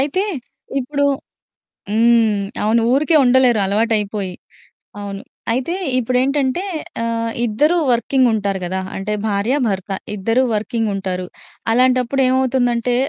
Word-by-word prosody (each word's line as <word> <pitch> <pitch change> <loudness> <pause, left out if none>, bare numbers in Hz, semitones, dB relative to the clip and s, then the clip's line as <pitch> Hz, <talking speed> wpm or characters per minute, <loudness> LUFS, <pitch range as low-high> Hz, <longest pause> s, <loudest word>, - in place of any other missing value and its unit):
అయితే 295 +8 0 0.6
ఇప్పుడు 285 +2 -1 0.9
హ్మ్, 225 -2 +3 0.2
అవును 225 +2 +3
ఊరికే 305 +4 +3
ఉండలేరు 245 -3 +4
అలవాటు 220 +4 +1
అయిపోయి. 200 -3 -4 0.7
అవును, 200 -1 -6 0.3
అయితే 260 +8 -1 0.2
ఇప్పుడేంటంటే 260 +5 +1 0.4
ఆహ్, 230 0 -1 0.2
ఇద్దరు 295 +11 +2
వర్కింగ్ 250 +2 +2
ఉంటారు 200 -3 -1
కదా! 190 +2 -2 0.2
అంటే 195 +2 -3
భార్య, 210 +4 0
భర్త 195 -2 -3 0.3
ఇద్దరూ 225 +6 +1
వర్కింగ్ 220 +1 -1
ఉంటారు. 185 -2 -3 0.5
అలాంటప్పుడు 255 +2 +2
ఏమవుతుందంటే 250 -2 +1
230 Hz, 110 wpm, -19 LUFS, 210-260 Hz, 0.9 s, ఉండలేరు